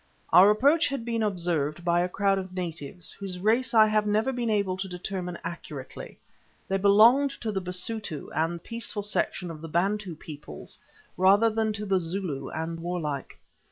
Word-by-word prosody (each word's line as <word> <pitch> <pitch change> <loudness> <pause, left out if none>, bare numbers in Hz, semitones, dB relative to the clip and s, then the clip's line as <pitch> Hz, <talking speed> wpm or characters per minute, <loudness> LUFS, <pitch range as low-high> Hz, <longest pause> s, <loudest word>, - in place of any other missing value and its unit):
Our 190 +3 +9
approach 280 +10 +4
had 275 -5 -4
been 230 -1 -1
observed 170 -5 -1
by 170 0 +3
a 180 - 0
crowd 195 +1 +1
of 185 -1 -7
natives, 170 -2 -5
whose 195 -2 -6
race 225 +7 +1
I 220 -1 +8
have 215 -1 +1
never 215 +6 +1
been 240 -2 -2
able 200 -3 +1
to 190 +1 -4
determine 180 -1 -5
accurately; 155 -5 -8 0.5
they 195 - +1
belonged 220 +8 +6
to 225 - -2
the 195 -2 -2
Basutu 180 -1 -2
and 165 +1 -1
peaceful 230 -2 -5
section 185 -3 -1
of 155 -2 -9
the 165 - -7
Bantu 190 +2 0
peoples 150 -1 -10 0.4
rather 200 +5 +5
than 220 0 0
to 210 0 -5
the 195 -2 +2
Zulu 165 -6 -4
and 165 +1 -4
warlike. 165 -5 -4
190 Hz, 170 wpm, -27 LUFS, 170-215 Hz, 0.5 s, Our